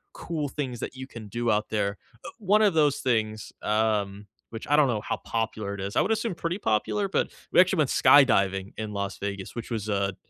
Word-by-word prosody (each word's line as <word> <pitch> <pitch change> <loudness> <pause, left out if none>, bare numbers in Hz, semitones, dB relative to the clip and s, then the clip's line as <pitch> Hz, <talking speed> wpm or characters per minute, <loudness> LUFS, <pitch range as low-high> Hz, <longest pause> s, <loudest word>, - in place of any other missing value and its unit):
cool 155 -4 -3
things 130 -4 -4
that - - -5
you 130 0 -7
can 110 -5 -10
do 120 +3 -2
out 105 0 +1
there, 100 -2 -1 0.3
uh - - -7
one 210 0 +3
of 200 -6 +3
those 150 -3 +3
things, 110 -4 -1
um, 105 -2 0 0.2
which 115 - -7
I 145 - +4
don't 150 -2 +5
know 110 -4 -1
how - - -3
popular 110 -3 -3
it 100 - -6
is- 100 +1 -5
I - - +4
would 220 - 0
assume 220 -4 -1
pretty 170 +4 -3
popular- 195 - 0
but, - - 0 0.2
we - - +4
actually 185 -1 +4
went 145 - +2
skydiving 100 -8 +4
in 110 -1 -5
Las 100 0 -3
Vegas, 100 +1 -5
which 120 +1 -6
was 110 -2 -3
a 100 -2 0
110 Hz, 220 wpm, -26 LUFS, 100-150 Hz, 0.3 s, don't